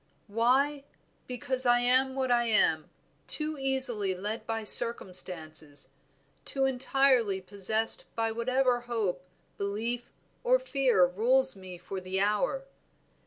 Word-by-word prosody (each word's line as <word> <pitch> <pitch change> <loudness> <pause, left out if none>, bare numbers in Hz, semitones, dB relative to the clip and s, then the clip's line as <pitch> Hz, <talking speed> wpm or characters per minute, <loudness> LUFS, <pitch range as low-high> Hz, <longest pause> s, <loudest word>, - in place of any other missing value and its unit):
"Why? 260 +6 0 0.4
because 255 +1 +3
I 240 0 +3
am 260 +2 +2
what 260 -2 -2
I 240 0 +1
am, 165 -8 0 0.4
too 310 0 +3
easily 255 -8 +2
led 210 +5 -6
by 225 -1 -4
circumstances, 160 - +2 0.5
too 270 -1 0
entirely 260 -5 0
possessed 205 +4 0
by 225 0 -2
whatever 250 +2 -1
hope, 200 -6 -3 0.4
belief, 225 +5 -4 0.3
or - - +3
fear 270 - +1
rules 250 +8 0
me 185 -2 -11
for 190 +2 -8
the 185 +1 -4
hour. 210 +7 -1
235 Hz, 120 wpm, -27 LUFS, 195-265 Hz, 0.5 s, because